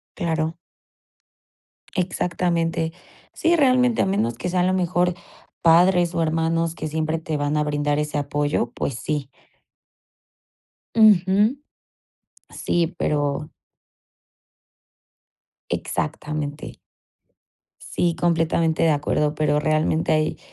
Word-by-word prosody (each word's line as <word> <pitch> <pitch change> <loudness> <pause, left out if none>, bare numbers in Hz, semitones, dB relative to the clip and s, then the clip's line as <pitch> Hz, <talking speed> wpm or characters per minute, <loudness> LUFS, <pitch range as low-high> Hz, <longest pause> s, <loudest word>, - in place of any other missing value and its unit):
Claro. 160 -1 -1 1.4
Exactamente. 170 -2 -1 0.4
Sí, 340 +1 +2
realmente, 255 -5 +3
a - - +1
menos 120 - 0
que 180 - -4
sea, 180 0 0
a - - +3
lo 185 - +2
mejor, 180 0 +1 0.5
padres, 175 +1 +4
o, 165 - +1
hermanos 165 +1 0
que - - -5
siempre 155 +1 -1
te 160 -1 -3
van 145 +1 -1
a 150 - +1
brindar 145 0 0
ese 150 0 -2
apoyo, 145 -3 -1
pues 140 - -3
sí. 140 +4 -3 1.7
Ujú. 210 +1 +5 1.0
Sí, 170 -1 0
pero 145 -1 -1 2.2
Exactamente. 150 - -4 1.1
Sí, 170 -1 +1
completamente 165 -1 +1
de 165 - +4
acuerdo. 150 0 0
Pero 150 -1 +1
realmente 155 +1 +1
hay 155 0 0
160 Hz, 100 wpm, -22 LUFS, 150-175 Hz, 2.2 s, Ujú